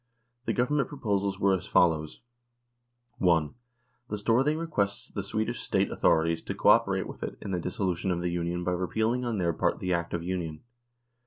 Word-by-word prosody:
The -, -, 0 dB
Government 135 Hz, +3 st, +1 dB
proposals 100 Hz, -7 st, -1 dB
were 100 Hz, 0 st, +4 dB
as 90 Hz, -, -6 dB
follows: 80 Hz, -3 st, +2 dB, 1.0 s
1. 85 Hz, -5 st, +3 dB, 0.6 s
The 105 Hz, -, -2 dB
Storthing 125 Hz, +9 st, +2 dB
requests 105 Hz, -12 st, -2 dB
th 100 Hz, -, -4 dB
Swedish 110 Hz, +4 st, -2 dB
State -, -, 0 dB
authorities 80 Hz, 0 st, +2 dB
to -, -, -5 dB
co -, -, +3 dB
operate -, -, +4 dB
with -, -, -9 dB
it -, -, -5 dB
in 100 Hz, -, -6 dB
the 90 Hz, -, 0 dB
dissolution 90 Hz, +1 st, -2 dB
of 90 Hz, -1 st, 0 dB
the 90 Hz, 0 st, -1 dB
Union 85 Hz, 0 st, -2 dB
by 90 Hz, -, 0 dB
repealing 110 Hz, +8 st, 0 dB
on 115 Hz, -3 st, -1 dB
their 85 Hz, -3 st, +1 dB
part -, -, 0 dB
the 90 Hz, 0 st, -1 dB
Act 85 Hz, 0 st, -1 dB
of 85 Hz, -, -3 dB
Union. 85 Hz, -4 st, -4 dB
95 Hz, 180 wpm, -28 LUFS, 85-110 Hz, 1.0 s, were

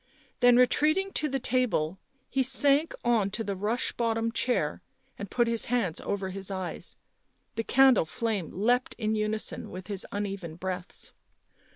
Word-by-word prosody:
Then 245 Hz, -1 st, +6 dB
retreating 310 Hz, +9 st, +3 dB
to 305 Hz, -, -1 dB
the 270 Hz, -, 0 dB
table 225 Hz, -10 st, 0 dB, 0.3 s
he 270 Hz, -, 0 dB
sank 280 Hz, +4 st, +3 dB
on 225 Hz, -5 st, +3 dB
to 225 Hz, +3 st, -2 dB
the 200 Hz, -2 st, -3 dB
rush 215 Hz, +6 st, -1 dB
bottom 230 Hz, -1 st, 0 dB
chair, 230 Hz, -10 st, 0 dB, 0.4 s
and 200 Hz, -1 st, -5 dB
put 240 Hz, -, +2 dB
his 230 Hz, -1 st, 0 dB
hands 230 Hz, -9 st, 0 dB
over 195 Hz, -2 st, -3 dB
his 195 Hz, +1 st, -5 dB
eyes; 185 Hz, -4 st, -5 dB, 0.6 s
the 225 Hz, -, -2 dB
candle 265 Hz, -6 st, +5 dB
flame 205 Hz, -1 st, -2 dB
leapt 245 Hz, +6 st, +1 dB
in 215 Hz, -2 st, -1 dB
unison 215 Hz, 0 st, -2 dB
with 185 Hz, 0 st, -8 dB
his 200 Hz, -2 st, -5 dB
uneven 195 Hz, -5 st, -4 dB
breaths. 180 Hz, +1 st, -6 dB
220 Hz, 155 wpm, -28 LUFS, 190-245 Hz, 0.6 s, Then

